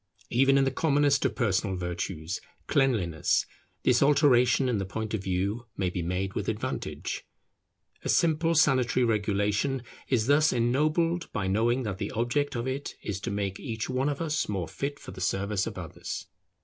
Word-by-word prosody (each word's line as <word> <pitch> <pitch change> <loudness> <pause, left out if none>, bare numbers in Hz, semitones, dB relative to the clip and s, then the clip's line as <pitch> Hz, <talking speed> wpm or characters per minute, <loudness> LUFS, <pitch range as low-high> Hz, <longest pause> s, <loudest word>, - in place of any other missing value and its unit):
Even 135 +3 +4
in 135 - +4
the 135 - +1
commonest 145 -2 +2
of 120 -5 0
personal 100 -3 +1
virtues, 90 -1 -4 0.2
cleanliness, 105 - +2 0.4
this 125 -1 +4
alteration 135 -3 +4
in 120 -5 +1
the - - -1
point 110 +3 -4
of 110 - -1
view 100 +6 -1
may 95 -2 0
be 90 - -3
made 90 +3 -2
with - - -2
advantage. - - -4 0.8
A - - -3
simple 165 0 +3
sanitary 130 -4 +3
regulation 105 +4 0 0.2
is 120 -5 +2
thus 145 +4 +4
ennobled 155 +8 +1
by 100 - -2
knowing 115 +7 +2
that 100 -4 -4
the - - -2
object 140 +5 0
of 120 +1 -2
it 135 +2 -4
is 100 -2 -3
to - - -3
make 100 -1 -2
each 115 -2 -4
one 130 +3 +1
of 145 +1 -3
us 155 -6 -1
more 95 -5 -2
fit 140 - -4
for - - -9
the 95 0 -9
service 95 +1 0
of - - -6
others. - - -6
120 Hz, 175 wpm, -28 LUFS, 100-140 Hz, 0.8 s, Even